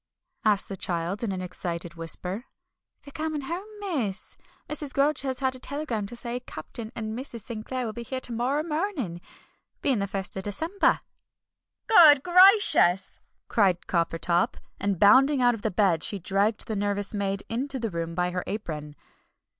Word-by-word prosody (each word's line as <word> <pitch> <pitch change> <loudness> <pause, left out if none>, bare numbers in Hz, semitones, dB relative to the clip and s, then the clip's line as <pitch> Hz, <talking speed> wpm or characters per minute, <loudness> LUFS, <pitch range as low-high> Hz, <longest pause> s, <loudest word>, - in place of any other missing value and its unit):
asked 210 -2 +2
the 195 - -5
child 175 +3 -2
in 220 - -1
an 185 -1 -4
excited 175 -2 -4
whisper. 180 +6 -5 0.6
"They're 285 - -12
coming 310 -1 -3
home, 345 +8 -5
miss. 270 - -3 0.3
Mrs. 300 -2 -3
Grudge 285 +2 +2
has 260 -2 -1
had 260 -1 +1
a 255 - -7
telegram 255 -7 -3
to 240 - -8
say 240 +1 -3
Captain 230 -2 -7
and 220 -1 -4
Mrs. 240 -2 -7
Sinclair 240 +3 -5
will 220 - -4
be 235 - -6
here 260 +3 -4
to 245 - -6
morrer 255 +6 0
mornin', 305 - -3 0.6
being 265 -6 +2
the 200 - -1
first 195 0 -4
of 190 - -3
December!" 320 - +1 0.8
"GOOD 305 - +7
GRACIOUS!" 365 - +6 0.3
cried 190 -5 +2
Coppertop. 170 0 0 0.2
And 200 -2 -1
bounding 265 - +6
out 245 -1 +4
of 225 - -6
bed 185 -7 +2
she 205 - -1
dragged 200 +4 0
the 220 - -3
nervous 205 0 -1
maid 200 -1 -2
into 265 +4 -3
the 230 -4 -3
room 165 -1 -4
by 180 0 0
her 180 0 -3
apron. 150 -8 -5
220 Hz, 165 wpm, -26 LUFS, 190-275 Hz, 0.8 s, GOOD